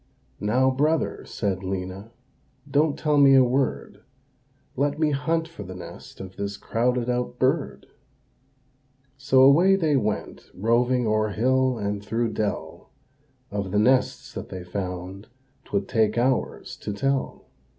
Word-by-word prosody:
"Now, 125 +6 +2
brother," 150 +4 0
said 95 -3 -2
Lena, 95 +2 -5 0.6
"don't 145 +1 +2
tell 150 -2 +2
me 135 -1 +7
a 130 - +7
word, 130 +2 -1 0.7
Let 145 +2 0
me 155 -1 +2
hunt 160 +4 0
for 165 -9 -11
the 95 -2 -8
nest 90 - -11
of 95 -1 -9
this 100 0 -4
crowded 125 +1 0
out 125 0 -2
bird," - - 0 1.3
So 135 -1 +4
away 170 +8 +6
they 160 -6 +1
went 105 -5 -2
roving 120 +5 +2
o'er 110 0 +1
hill 130 +4 +1
and 100 -1 -3
through 115 +3 -1
dell; 105 -2 -4 0.6
Of 100 -2 -3
the 105 - -1
nests 125 +5 +2
that - - -7
they 90 -1 -7
found 90 +2 -6 0.4
'twould 100 -1 -2
take 110 -1 +1
hours 125 +2 -1
to 105 - -5
tell. 135 +5 -2
120 Hz, 140 wpm, -25 LUFS, 100-135 Hz, 1.3 s, me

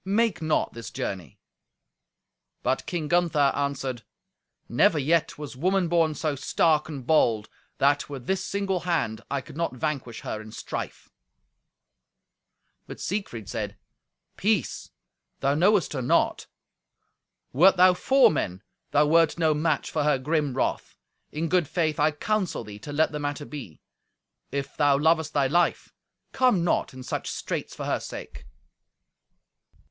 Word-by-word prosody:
Make 205 0 +1
not 155 -1 0
this 115 -1 -7
journey." 95 - -5 1.3
But 130 +2 0
King 165 -4 -2
Gunther 170 -4 +3
answered, 135 -4 -2 0.7
"Never 160 - +3
yet 155 +3 +1
was 145 -3 -7
woman 180 +5 +1
born 165 -2 +2
so 155 -1 -1
stark 155 +3 +1
and 140 -5 -7
bold, 115 -8 +3 0.3
that, 145 +2 +2
with 135 -4 -7
this 190 +3 0
single 195 -2 -1
hand, 165 -11 -1
I 140 -1 -1
could 130 - -13
not 165 -5 -2
vanquish 130 -4 -3
her 110 - -5
in 110 0 -11
strife." - - -6 1.8
But - - -9
Siegfried 165 - -4
said, 105 -2 -4 0.6
"Peace! 205 - 0 0.5
Thou 140 +1 +2
knowest 185 +4 +3
her 135 - -2
not. 125 - +1 1.1
Wert 180 +8 +6
thou 185 0 +7
four 265 +8 +4
men, 95 - -3 0.3
thou 150 +1 +4
wert 165 +2 +4
no 160 -2 +3
match 150 -1 0
for 155 - 0
her 150 -2 +3
grim 145 0 -1
wrath. - - -2 0.3
In 160 +2 -2
good 175 -2 +2
faith 155 -3 -1
I 150 +1 +4
counsel 185 - -1
thee 105 -1 -10
to 145 - -8
let 155 +2 +2
the 150 - -4
matter 145 0 -3
be. 130 - -9 0.7
If 140 -1 -4
thou 145 -2 +4
lovest 160 +1 +2
thy 140 -2 +3
life, 175 +6 +1 0.4
come 250 -9 +3
not 175 - +1
in 130 0 -10
such - - -4
straits - - -4
for - - -5
her - - 0
sake." - - -9
150 Hz, 145 wpm, -26 LUFS, 135-170 Hz, 1.8 s, thou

